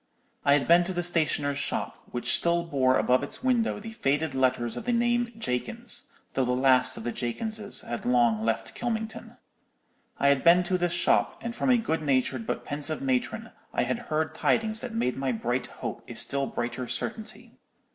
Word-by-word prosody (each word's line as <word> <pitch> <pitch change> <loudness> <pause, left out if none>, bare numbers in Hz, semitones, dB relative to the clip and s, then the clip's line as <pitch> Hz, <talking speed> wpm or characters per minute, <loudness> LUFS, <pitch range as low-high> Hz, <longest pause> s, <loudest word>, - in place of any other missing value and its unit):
I 140 - +5
had 145 -1 +2
been 170 +1 +6
to 190 - -3
the 175 0 -1
stationer's 150 -4 +2
shop, - - -2
which 120 - -1
still 170 0 +1
bore 130 -5 +2
above 125 +1 +3
its 145 - -6
window 245 -5 +1
the 225 +2 -8
faded 150 -6 0
letters 130 -3 +1
of - - -6
the 245 - +1
name 240 0 +1
'Jakins,' 235 - -1 0.2
though 135 - +1
the 125 0 0
last 130 0 +3
of - - -7
the 120 - -2
Jakinses 205 - -2
had 120 - -5
long 120 -3 +3
left 115 0 -1
Kylmington. 220 -2 -4 0.8
I 140 - +3
had 140 -1 +2
been 175 +1 +6
to 180 +1 0
this 175 -1 +1
shop, - - +2
and 235 0 -5
from - - 0
a 250 - +6
good 165 -9 -1
natured 130 -4 0
but - - -3
pensive 150 +2 -3
matron 135 - -1 0.2
I - - +2
had 235 - -1
heard 155 0 0
tidings 220 +6 +1
that 250 - -5
made 225 - -1
my 135 -1 0
bright 120 +2 -2
hope - - -6
a - - -7
still 140 -1 +2
brighter 120 +1 -4
certainty. 220 - -4
150 Hz, 190 wpm, -27 LUFS, -, 0.8 s, been